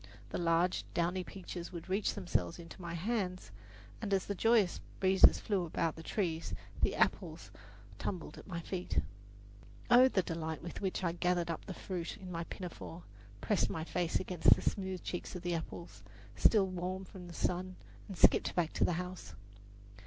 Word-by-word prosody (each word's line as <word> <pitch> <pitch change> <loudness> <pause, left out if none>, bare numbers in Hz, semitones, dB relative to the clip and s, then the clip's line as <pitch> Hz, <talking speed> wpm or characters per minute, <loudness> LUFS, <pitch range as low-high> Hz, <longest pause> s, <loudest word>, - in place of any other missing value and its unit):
The - - -3
large, 170 +1 +2
downy 175 +2 +1
peaches 180 -2 -7
would 170 -2 -7
reach 195 +2 +1
themselves 175 - -1
into 170 +2 -10
my 170 -1 -4
hand, 185 - -2 0.5
and 200 - -3
as 190 - 0
the 200 - -2
joyous 220 -1 +3 0.2
breezes 190 0 +6
flew 200 -4 0
about 165 -1 -1
the 160 - -8
trees 165 -2 -2 0.3
the - - +3
apples - - 0 0.5
tumbled 170 -5 -4
at - - -13
my 170 -3 -4
feet. 180 +1 -1 0.9
Oh, 250 +2 +9
the 195 -7 +2
delight 160 -2 -4
with 175 - -6
which 190 -1 -1
I 170 - +2
gathered 175 0 +1
up 165 - -5
the 190 - -6
fruit 175 -3 -4
in 185 -1 -8
my 170 -1 -3
pinafore, 175 -1 -7 0.4
pressed 210 - +2
my 160 - -3
face 170 0 0
against 180 -3 +5
the - - -7
smooth 190 -3 -1
cheeks 175 - -4
of 180 - -6
the 175 0 0
apples, 170 +1 -6 0.3
still 210 -4 +5
warm 185 +1 -3
from 180 -1 -10
the 170 - -9
sun, 185 +1 -1 0.3
and 195 -4 -7
skipped - - +5
back 170 -3 +1
to - - +1
the - - +3
house! 180 +1 -5
180 Hz, 175 wpm, -34 LUFS, 170-190 Hz, 0.9 s, Oh